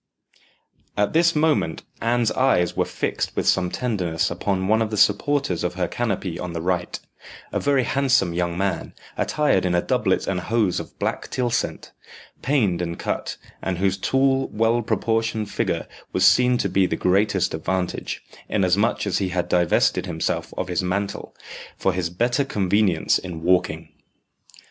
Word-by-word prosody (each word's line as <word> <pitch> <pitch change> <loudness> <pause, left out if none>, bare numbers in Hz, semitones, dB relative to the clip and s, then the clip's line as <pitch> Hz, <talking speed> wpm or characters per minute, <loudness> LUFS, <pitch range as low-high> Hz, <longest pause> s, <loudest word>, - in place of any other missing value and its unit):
At 105 0 +1
this 170 +1 +4
moment 150 - +1 0.2
Anne's 115 0 +1
eyes 90 -9 +2
were - - +1
fixed - - -3
with - - -1
some 90 -1 +3
tenderness 90 -11 -1
upon 95 +2 -1
one 110 +2 +3
of 110 - 0
the 105 - -3
supporters 105 - +2
of 90 0 -2
her 90 -2 0
canopy 100 -6 -2
on 90 -1 -5
the 85 - -3
right 90 -1 -1 0.5
a - - +1
very 140 -2 +2
handsome 130 -9 +2
young 85 0 -1
man, 95 -2 -2 0.2
attired 150 -11 +1
in 90 -1 +1
a 85 - +3
doublet - - +1
and 95 -2 -1
hose 105 0 0
of - - -9
black - - -3
tylsent, 125 -1 -2 0.5
paned 110 -11 +1
and 85 -1 -3
cut, - - -3 0.2
and 95 -2 -2
whose 95 +1 +1
tall, 135 +6 +1
well 115 +2 +1
proportioned 110 -1 -1
figure - - -1 0.3
was - - +3
seen 125 0 +5
to - - 0
the 95 -1 +2
greatest 95 +1 +1
advantage, 90 +3 -3 0.3
inasmuch 100 +3 +1
as 100 - 0
he 95 -2 -1
had 90 -1 -1
divested 90 -2 +2
himself 80 -2 -2
of - - -2
his - - 0
mantle, 100 +2 -3 0.4
for 95 - +1
his 90 -1 -1
better 120 +10 +1
convenience 100 -7 +1
in 85 -3 -7
walking. 90 +1 +1
100 Hz, 160 wpm, -23 LUFS, 90-115 Hz, 0.5 s, seen